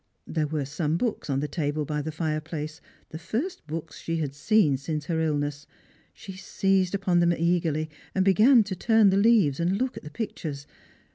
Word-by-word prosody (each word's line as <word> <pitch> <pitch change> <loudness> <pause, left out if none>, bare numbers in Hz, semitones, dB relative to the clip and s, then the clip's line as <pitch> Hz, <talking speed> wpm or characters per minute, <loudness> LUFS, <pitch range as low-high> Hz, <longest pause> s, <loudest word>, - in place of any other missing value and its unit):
There 155 -2 -1
were 150 -2 -2
some 150 +3 -1
books 225 -5 -2
on 135 0 0
the 150 - -2
table 150 -2 -2
by 150 0 -2
the 160 +2 -4
fireplace, 155 0 -4 0.3
the 160 - -7
first 225 - -4
books 160 0 -6
she 165 0 -3
had 145 -4 -2
seen 150 -1 +3
since 150 +2 -4
her 160 0 -1
illness. 145 -2 -2 0.4
She 195 - -10
seized 190 0 0
upon 190 -3 +1
them 170 0 +3
eagerly, 165 -2 0 0.3
and 190 -1 +2
began 220 +5 +6
to 195 -2 -5
turn 220 +1 +4
the 190 - +2
leaves, 200 - +4
and 175 +3 +1
look 260 +3 -2
at - - -6
the 150 - -8
pictures. 155 -8 -5
165 Hz, 190 wpm, -26 LUFS, 150-195 Hz, 0.4 s, began